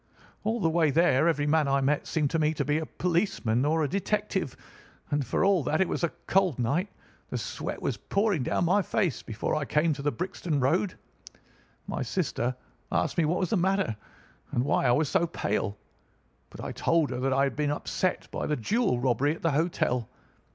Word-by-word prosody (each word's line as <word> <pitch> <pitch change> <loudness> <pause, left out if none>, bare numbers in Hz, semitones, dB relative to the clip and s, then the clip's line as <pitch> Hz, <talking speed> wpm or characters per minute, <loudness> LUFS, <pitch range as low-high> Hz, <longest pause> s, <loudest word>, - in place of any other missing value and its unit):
All 225 +3 0
the 175 - +2
way 165 -1 +3
there 160 -1 +4
every 150 -3 +2
man 150 0 +3
I 140 0 +3
met 140 +2 0
seemed 150 -3 0
to 165 - +1
me 155 0 +2
to - - -1
be 150 +1 +1
a 160 - -5
policeman 165 - 0
or 160 +1 +2
a - - +1
detective; 200 - -1 0.5
and, 145 -1 +1
for 130 - 0
all 195 -3 +4
that 155 +4 +1
it 190 - +3
was - - -3
a 170 - +3 0.2
cold 185 -7 +2
night, 145 - 0 0.4
the - - -2
sweat - - -4
was - - -1
pouring 200 -5 0
down 170 - 0
my 190 +4 +3
face 190 - 0
before 110 -1 -3
I 155 - 0
came 155 +3 +2
to 140 - -6
the 145 +1 +1
Brixton 170 -3 -2
Road. 165 +9 +1 0.9
My - - -3
sister 130 - -1 0.4
asked - - 0
me 165 - +4
what 170 +4 +1
was 185 - -1
the 220 - +3
matter, 190 - +1 0.6
and 120 - +1
why 135 - +2
I - - +5
was 150 +5 +2
so 170 - +2
pale; 105 -9 -2 0.7
but - - -10
I - - -4
told 165 -5 +1
her 125 - -3
that 135 +1 0
I 135 +1 +3
had 140 - 0
been 150 -1 0
upset 175 +5 -1
by - - -3
the 150 - 0
jewel 195 - +1
robbery 130 +4 +1
at - - -15
the 165 - +3
hotel. 140 -6 0
155 Hz, 205 wpm, -28 LUFS, 135-180 Hz, 0.9 s, I